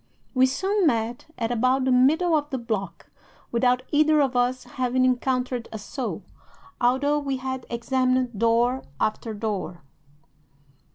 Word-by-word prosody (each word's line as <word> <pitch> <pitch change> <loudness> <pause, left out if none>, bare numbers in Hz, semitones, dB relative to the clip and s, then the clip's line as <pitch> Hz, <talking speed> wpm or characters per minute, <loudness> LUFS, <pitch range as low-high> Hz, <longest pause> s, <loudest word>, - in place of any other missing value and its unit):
"'We 260 -1 +4
soon 385 +7 +1
met 230 0 -1
at 230 0 -2
about 255 +3 +2
the 260 - +2
middle 315 +7 +4
of 295 -1 -1
the 265 - -2
block, 210 -7 -5 0.4
without 250 +1 +2
either 305 +1 +4
of 270 -3 +1
us 250 +1 +1
having 255 +1 0
encountered 255 -1 0
a 220 - -5
soul, 245 +5 -5 0.6
although 275 +4 +2
we 275 -2 -2
had 260 0 -5
examined 255 -1 0
door 235 +3 +2 0.2
after 215 +1 -2
door. 205 -6 -4
255 Hz, 135 wpm, -25 LUFS, 235-265 Hz, 0.6 s, We